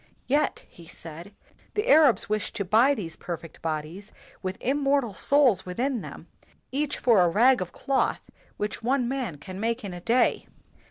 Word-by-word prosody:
"Yet," 290 +4 0
he 170 -1 -16
said, 165 +5 -10 0.4
"the 420 +3 -1
Arabs 295 - +5
wish 215 -2 -1
to 200 - -3
buy 230 +9 +4
these 170 -9 -6
perfect 165 -2 -8
bodies 160 +5 -5 0.3
with 190 0 -4
immortal 275 -3 +1
souls 255 -4 +3
within 240 +6 -2
them, - - -10 0.5
each 285 +2 -1
for 230 -6 +4
a 175 - +4
rag 240 +6 +4
of 180 -1 -4
cloth 275 -1 0 0.4
which 210 0 -3
one 250 +1 +1
man 250 - -3
can 185 +6 -9
make 230 +2 -1
in 190 - -6
a 175 - -8
day. 235 +7 +1
220 Hz, 165 wpm, -26 LUFS, 180-265 Hz, 0.5 s, Arabs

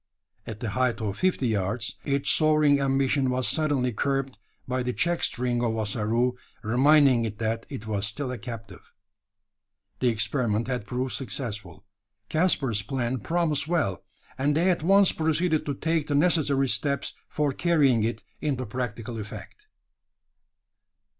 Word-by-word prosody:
At 110 -1 -7
the 115 -4 -2
height 125 0 0
of 105 -3 -3
fifty 180 -9 +1
yards 105 +2 -2
its 140 0 +2
soaring 155 -2 +4
ambition 135 0 +1
was 125 0 0
suddenly 145 -6 0
curbed, 135 -1 -1 0.3
by 130 0 -1
the 125 0 -2
check 175 +4 +1
string 120 0 0
of 115 -2 0
Ossaroo, 110 +3 0 0.3
reminding 130 +2 +4
it 110 -2 -4
that 115 +1 -2
it 130 -7 -7
was 105 -2 -1
still 125 +5 -4
a 125 - -5
captive. 110 -5 -9 1.1
The 130 - +1
experiment 115 0 0
had 125 -5 -3
proved 125 0 -2
successful. 110 - -6 0.4
Caspar's 140 - +2
plan 130 +3 -2
promised 155 - 0
well; 155 - 0 0.4
and 145 +2 +2
they 180 +3 +3
at 175 - -1
once 195 +3 +5
proceeded 160 0 0
to 140 - -1
take 160 +1 -1
the 145 - 0
necessary 145 -4 +3
steps 140 +2 -1 0.2
for 150 -2 0
carrying 140 -7 +2
it 115 0 -2 0.2
into 135 -4 -1
practical 115 0 -4
effect. 105 -1 -9
130 Hz, 145 wpm, -26 LUFS, 110-145 Hz, 1.1 s, once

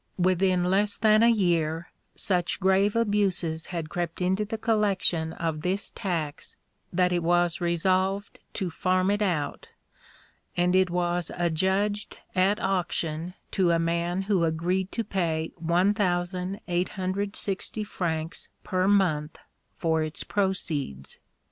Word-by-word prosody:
Within 185 0 +2
less 200 +3 +1
than 215 0 +5
a 230 - +6
year, 170 -6 +1 0.2
such 180 -2 0
grave 195 +2 +3
abuses 195 -7 0
had 170 -3 -4
crept 175 -1 -3
into 185 +3 +1
the 220 +2 -4
collection 200 -7 +1
of 160 -2 -3
this 190 +4 -1
tax 165 -8 -4 0.4
that 180 0 +2
it 175 - +1
was 175 0 +2
resolved 185 +4 0
to 185 -5 -3
farm 185 +3 +1
it 205 +1 0
out, 160 -8 -1 0.9
and 180 +1 +3
it 185 -1 +4
was 175 -1 0
adjudged 190 +5 0 0.2
at 190 +3 +2
auction 175 -2 -1 0.2
to 185 -3 +2
a 170 - +4
man 170 +2 0
who 190 -3 +1
agreed 175 +4 0
to 230 - -1
pay 165 -6 -1
1860 185 +2 -1
francs 165 -4 -3
per 185 -2 0
month 170 -7 +2 0.4
for 160 -1 +1
its 155 0 -2
proceeds. 165 - -2
180 Hz, 125 wpm, -27 LUFS, 170-195 Hz, 0.9 s, a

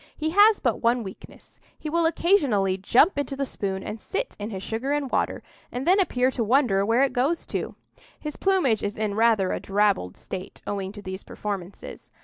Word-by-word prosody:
He 315 +1 -1
has 410 +3 +6
but 240 -4 0
one 235 +1 +2
weakness—he 195 +9 -12
will 330 +1 +2
occasionally 275 - +2
jump 250 - +3
into 280 -1 -3
the 275 0 -1
spoon 195 -6 -4
and 220 - -6
sit - - -3
in 205 +1 -4
his 190 -3 -6
sugar 250 +6 -2
and 285 -3 -2
water, - - -1 0.3
and 250 +2 -4
then 370 +3 +5
appear 260 -8 +2
to 245 - -1
wonder 225 -4 +3
where 230 +6 +3
it 275 - +1
goes 280 +7 0
to. - - -4 0.4
His 300 -1 -6
plumage 360 - +2
is 205 0 -3
in 215 -1 -1
rather 220 -3 +3
a - - -2
drabbled 200 - 0
state, 185 0 -8
owing 195 -2 -3
to 205 -1 -10
these 190 0 -6
performances. 200 -3 -7
230 Hz, 190 wpm, -25 LUFS, 200-290 Hz, 0.4 s, has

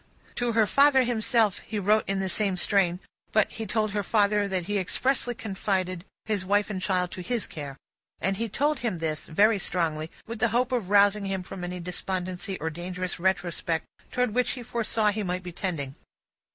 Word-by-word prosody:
To 240 -1 -1
her 220 -1 +4
father 275 +3 +5
himself, 225 -3 +2
he 220 - -6
wrote 210 +2 +2
in 195 - +1
the 190 0 -1
same 195 -1 +1
strain; 180 -2 +3 0.3
but, 215 -1 +3
he 220 -1 -5
told 215 +1 0
her 205 0 0
father 205 0 +2
that 185 -3 -2
he 205 +1 0
expressly 245 +6 0
confided 190 -4 -2 0.2
his 210 -4 0
wife 205 +2 +1
and 190 -2 -3
child 180 -2 0
to 185 - -6
his 235 +4 -1
care. 140 -3 -7 0.4
And 195 +2 0
he 230 +1 -2
told 290 +6 +1
him 225 -7 -1
this, 160 -2 -3
very 205 +5 +4
strongly, 160 -4 -1 0.2
with 230 -1 -6
the 240 - +4
hope 245 +3 +1
of 235 -7 -1
rousing 205 0 +5
him 190 -1 -2
from 180 0 -8
any 180 0 -4
despondency 185 +2 -3
or 160 +1 -2
dangerous 180 +2 -4
retrospect 170 -3 0 0.3
towards 250 -3 0
which 245 -2 +2
he 250 - -7
foresaw 225 -2 +1
he 215 +1 -3
might 180 -2 -2
be 180 - -6
tending. 160 -7 -3
200 Hz, 190 wpm, -27 LUFS, 180-220 Hz, 0.4 s, father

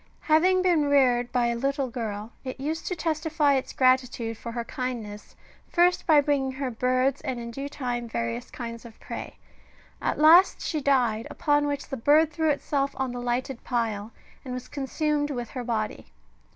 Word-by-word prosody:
Having 365 +4 +3
been 340 -5 +3
reared 250 -4 +3
by 245 -1 +2
a 235 0 0
little 275 +1 -1
girl, 220 -2 -4
it 255 0 -6
used 310 +4 -3
to 365 - -1
testify 310 -2 +1
its 265 -1 -1
gratitude 255 -3 +2
for 235 +2 -7
her 235 0 -3
kindness, 230 -5 -6 0.3
first 350 +1 +2
by 310 -3 +7
bringing 275 -2 0
her 265 -1 -3
birds, 255 +3 +1
and 250 -2 -3
in 235 0 -6
due 275 +4 -5
time 245 -4 -4
various 115 - -3
kinds 230 -2 -7
of 230 -2 -13
prey: - - -7 0.6
at - - -1
last 330 +5 +6
she 310 -3 -2
died, 245 -5 +2
upon 290 0 +1
which 285 -1 -3
the 270 - -4
bird 300 +5 +4
threw 315 +1 +1
itself 280 -1 -1
on 265 -1 -1
the 245 0 -5
lighted 245 +1 -2
pile, 225 -3 -2 0.3
and 255 -2 -5
was 255 - -7
consumed 295 +1 -1
with 245 -5 -4
her 255 -2 -5
body. 220 -3 -3
260 Hz, 180 wpm, -26 LUFS, 240-290 Hz, 0.6 s, by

